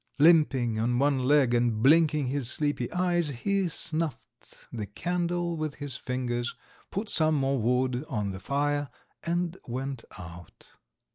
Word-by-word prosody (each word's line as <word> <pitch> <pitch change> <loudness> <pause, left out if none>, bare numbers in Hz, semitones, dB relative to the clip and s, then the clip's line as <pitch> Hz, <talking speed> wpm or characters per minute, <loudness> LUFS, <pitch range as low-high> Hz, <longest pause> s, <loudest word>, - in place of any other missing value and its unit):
Limping 145 -8 +4
on 120 +2 +1
one 140 0 +2
leg, 130 -1 +3
and 120 -2 +1
blinking 150 0 +5
his 130 -1 -2
sleepy 145 -4 -1
eyes, 175 -2 +1
he 185 +9 0
snuffed 160 -3 -5
the 110 -4 -4
candle 175 - -1
with 155 -2 -3
his 145 -3 -5
fingers, 125 -1 -3 0.3
put 205 +3 -3
some 155 -5 +3
more 135 -1 +1
wood 125 +2 +1
on 105 -7 -2
the 95 - -7
fire 145 +5 -1 0.3
and 175 +1 -1
went 130 0 -4
out. 85 -2 -12
140 Hz, 140 wpm, -28 LUFS, 120-160 Hz, 0.3 s, blinking